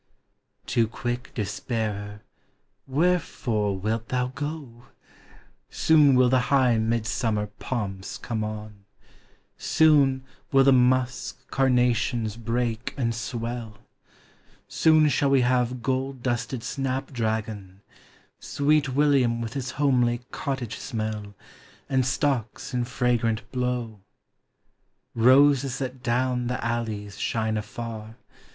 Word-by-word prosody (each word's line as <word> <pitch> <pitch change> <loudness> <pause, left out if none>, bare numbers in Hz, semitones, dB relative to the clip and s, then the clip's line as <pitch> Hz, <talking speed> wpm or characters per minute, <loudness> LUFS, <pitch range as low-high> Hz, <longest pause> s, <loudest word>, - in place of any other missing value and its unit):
Too 115 -2 +1
quick 120 +3 -4
despairer, 105 -1 -3 0.6
wherefore 130 - 0
wilt 110 +4 -2
thou 125 0 0
go? 135 -4 -6 0.8
Soon 150 -4 +4
will 125 0 +5
the 130 +1 +3
high 130 -5 +4
Midsummer 110 -1 0
pomps 100 -6 -4
conic 110 -3 -3
on, 105 -1 -9 0.7
Soon 140 -4 +4 0.3
will 135 -1 +6
the 135 0 +6
musk 130 0 +1
carnations 125 -4 +1
break 115 0 -2
and 115 -4 0
swell, 115 -2 -5 0.9
Soon 155 -1 +4
shall 140 0 +2
we 135 -1 +4
have 125 -1 +1
gold 130 -1 -2
dusted 120 -1 -2
snapdragon, 110 -7 -3 0.6
Sweet 145 0 +1
William 130 -4 +2
with 115 0 -4
his 130 -3 -3
homely 125 -4 +2
cottage 130 -5 -4
smell, 110 -2 -4 0.5
And 130 -1 +2
stocks 135 -2 -1
in 125 -1 0
fragrant 120 -3 0
blow; 125 -4 -2 1.1
Roses 135 +2 +4
that 130 -1 -5
down 125 0 0
the 125 -2 -3
alleys 110 -4 -3
shine 110 -1 -1
afar. 110 +1 -6
120 Hz, 105 wpm, -25 LUFS, 110-130 Hz, 1.1 s, will